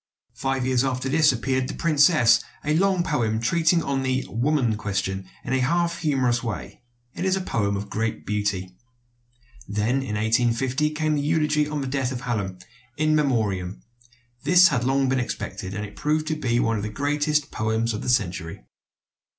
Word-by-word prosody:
Five 135 Hz, -1 st, -2 dB
years 130 Hz, -1 st, +2 dB
after 130 Hz, 0 st, -1 dB
this 150 Hz, +1 st, +4 dB
appeared 130 Hz, +1 st, -1 dB
"The -, -, -5 dB
Princess," 145 Hz, -7 st, +4 dB, 0.2 s
a 150 Hz, +1 st, +1 dB
long 190 Hz, 0 st, +2 dB
poem 115 Hz, -10 st, 0 dB
treating 165 Hz, +7 st, +2 dB
of 135 Hz, -1 st, -1 dB
the 130 Hz, 0 st, -1 dB
"woman 120 Hz, -1 st, +1 dB
question" 95 Hz, -2 st, -3 dB
in 130 Hz, -, -3 dB
a 130 Hz, -, +2 dB
half 170 Hz, +6 st, +1 dB
humorous 130 Hz, -6 st, +1 dB
way. 115 Hz, -3 st, -6 dB, 0.3 s
It -, -, -5 dB
is 190 Hz, 0 st, +2 dB
a -, -, -1 dB
poem 100 Hz, -, -1 dB
of 100 Hz, +1 st, -5 dB
great 110 Hz, +2 st, -3 dB
beauty. 100 Hz, -3 st, -2 dB, 0.9 s
Then 110 Hz, +6 st, 0 dB
in 110 Hz, -6 st, -4 dB
1850 120 Hz, +6 st, +1 dB
came 155 Hz, 0 st, 0 dB
the 145 Hz, +1 st, 0 dB
elegy 150 Hz, -2 st, +2 dB
on 150 Hz, -1 st, -3 dB
the -, -, -3 dB
death 130 Hz, -1 st, -1 dB
of 125 Hz, -1 st, -5 dB
Hallam, 105 Hz, -7 st, -3 dB, 0.4 s
"In 155 Hz, +1 st, +2 dB
Memoriam." 105 Hz, -10 st, 0 dB, 0.6 s
This 180 Hz, +2 st, +6 dB
had 150 Hz, -7 st, +1 dB
been 120 Hz, -, -2 dB
long 135 Hz, -1 st, +2 dB
expected, 95 Hz, -5 st, -4 dB
and 105 Hz, +1 st, -3 dB
it 105 Hz, -, -12 dB
proved 155 Hz, +1 st, 0 dB
to 155 Hz, -, 0 dB
be 120 Hz, -6 st, 0 dB
one 115 Hz, -2 st, +1 dB
of -, -, -3 dB
the 105 Hz, -, -3 dB
greatest 145 Hz, +4 st, 0 dB
poems 110 Hz, +1 st, -1 dB
of 105 Hz, -, -4 dB
the -, -, -3 dB
century. 85 Hz, -, -1 dB
130 Hz, 180 wpm, -24 LUFS, 110-150 Hz, 0.9 s, This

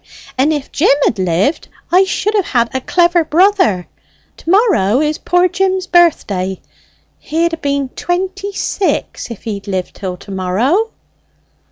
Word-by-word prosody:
And 270 Hz, +4 st, +2 dB
if 295 Hz, -3 st, -3 dB
Jim 285 Hz, -1 st, +3 dB
had 215 Hz, -, 0 dB
lived, 185 Hz, -, 0 dB, 0.2 s
I 370 Hz, +2 st, +5 dB
should 410 Hz, +3 st, -1 dB
have 405 Hz, -4 st, +1 dB
had 235 Hz, -3 st, 0 dB
a 260 Hz, -, -2 dB
clever 345 Hz, +3 st, +2 dB
brother! 345 Hz, -, +2 dB, 0.5 s
To -, -, -8 dB
morrow 340 Hz, -, +3 dB
is 305 Hz, 0 st, 0 dB
poor 355 Hz, +1 st, +2 dB
Jim's 375 Hz, +1 st, 0 dB
birthday. 205 Hz, -, +1 dB, 0.6 s
He'd 330 Hz, +2 st, -1 dB
ha' 330 Hz, -, -5 dB
been 280 Hz, -2 st, -1 dB
twenty 380 Hz, +6 st, -3 dB
six 395 Hz, -6 st, -2 dB
if 230 Hz, -, -9 dB
he'd 205 Hz, -3 st, -5 dB
lived 190 Hz, -2 st, -3 dB
till 185 Hz, -3 st, -5 dB
to 200 Hz, -, -12 dB
morrow." 225 Hz, -, 0 dB
310 Hz, 150 wpm, -15 LUFS, -, 0.6 s, I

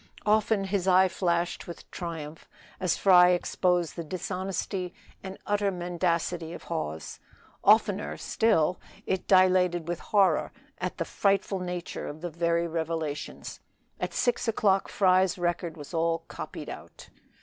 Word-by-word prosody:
Often 215 Hz, -1 st, +3 dB
his 195 Hz, -1 st, -1 dB
eye 185 Hz, 0 st, +6 dB
flashed 175 Hz, -1 st, -1 dB
with 170 Hz, -, -10 dB
triumph, 160 Hz, -3 st, -7 dB, 0.3 s
as 185 Hz, -2 st, +1 dB
Fry 180 Hz, -2 st, +7 dB
exposed 180 Hz, -1 st, +1 dB
the 170 Hz, -, -4 dB
dishonesty 185 Hz, +2 st, -4 dB, 0.3 s
and 190 Hz, 0 st, -7 dB
utter 205 Hz, -1 st, +1 dB
mendacity 175 Hz, -2 st, -1 dB
of -, -, -9 dB
Hawes. 80 Hz, -, -5 dB, 0.4 s
Oftener 75 Hz, +2 st, +3 dB
still 180 Hz, -, +1 dB, 0.3 s
it 190 Hz, -1 st, -2 dB
dilated 180 Hz, -3 st, +4 dB
with 175 Hz, -1 st, -2 dB
horror 200 Hz, -3 st, +2 dB, 0.3 s
at -, -, -3 dB
the -, -, -2 dB
frightful 195 Hz, -1 st, +1 dB
nature 180 Hz, -1 st, -5 dB
of 150 Hz, +2 st, -8 dB
the 175 Hz, -1 st, -4 dB
very 170 Hz, +1 st, +1 dB
revelations. 160 Hz, -2 st, -4 dB, 0.4 s
At -, -, -2 dB
six 245 Hz, 0 st, 0 dB
o'clock 200 Hz, -3 st, +2 dB
Fry's 185 Hz, -1 st, +3 dB
record 175 Hz, -1 st, -2 dB
was 145 Hz, +3 st, -10 dB
all 165 Hz, 0 st, 0 dB
copied -, -, -7 dB
out. -, -, -10 dB
180 Hz, 135 wpm, -28 LUFS, 170-190 Hz, 0.4 s, Fry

